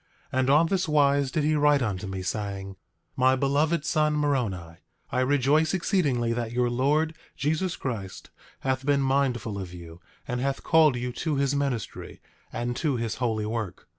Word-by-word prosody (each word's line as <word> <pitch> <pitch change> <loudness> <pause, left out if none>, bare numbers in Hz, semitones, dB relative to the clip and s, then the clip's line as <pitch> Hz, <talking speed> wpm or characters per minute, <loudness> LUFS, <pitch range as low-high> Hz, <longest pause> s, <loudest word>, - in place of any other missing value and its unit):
And 130 0 +1
on 150 +4 +5
this 180 +1 0
wise 140 -2 +3
did 150 +3 -1
he 155 +1 +2
write 145 -2 +3
unto 100 -3 -3
me, 95 -1 -5
saying: 100 0 -3
8:2 - - -13 0.4
My 130 +1 +4
beloved 145 +4 +1
son, 155 -1 +2
Moroni, 105 - -1 0.3
I 125 - 0
rejoice 145 +5 +2
exceedingly 145 - +1
that 115 -1 -3
your 120 0 +1
Lord 150 +6 +1 0.2
Jesus 160 +7 0
Christ 100 -8 -6 0.3
hath 130 0 -1
been 140 0 +2
mindful 130 -6 0
of 90 -2 -7
you, 85 0 -11 0.3
and 125 -1 -2
hath 135 +1 -2
called 160 -5 +5
you 125 +1 -3
to 150 +4 -2
his 140 0 +1
ministry, 135 -7 -3 0.3
and 120 +1 -3
to 150 -5 0
his 115 -2 -3
holy 110 -4 -1
work. 110 -4 -4
130 Hz, 170 wpm, -26 LUFS, 115-145 Hz, 0.4 s, on